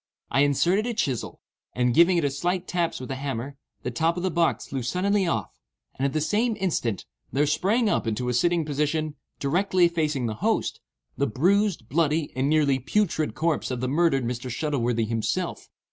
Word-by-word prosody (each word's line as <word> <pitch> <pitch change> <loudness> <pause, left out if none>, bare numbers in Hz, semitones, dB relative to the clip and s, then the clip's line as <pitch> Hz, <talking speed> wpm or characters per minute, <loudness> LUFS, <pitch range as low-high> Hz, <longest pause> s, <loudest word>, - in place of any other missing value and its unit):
I 135 - +3
inserted 175 - +2
a 240 - -2
chisel, 135 - -2 0.3
and 125 -1 +2
giving 170 +5 +5
it 170 - +1
a - - +4
few - - -2
slight 180 +4 -1
taps 175 -2 -1
with 130 +1 -6
a - - -2
hammer, 135 0 -4 0.3
the 125 - -2
top 165 +8 +1
of 175 - -3
the 185 - 0
box 170 0 +1
flew 135 -1 -4
suddenly 190 - +1
off, 170 - -1 0.4
and 135 - 0
at 135 - -4
the 155 - +1
same 215 +8 +1
instant, 125 - -1 0.3
there 145 +2 +2
sprang 200 +11 +2
up 205 - 0
into 115 +3 -1
a 125 - 0
sitting 170 +6 +2
position, 150 +1 -1 0.3
directly 180 +5 +3
facing 155 -6 -1
the 110 - -1
host, - - 0 0.4
the 140 - +2
bruised, 180 - +1
bloody, 155 +1 0
and 130 +2 +1
nearly 145 -4 +3
putrid 160 +2 0
corpse 160 -1 0
of 125 -2 -3
the 130 - -1
murdered 140 -2 +2
Mr. 125 +2 -4
Shuttleworthy 120 -4 0
himself. 115 -1 -2
150 Hz, 190 wpm, -25 LUFS, 130-175 Hz, 0.4 s, giving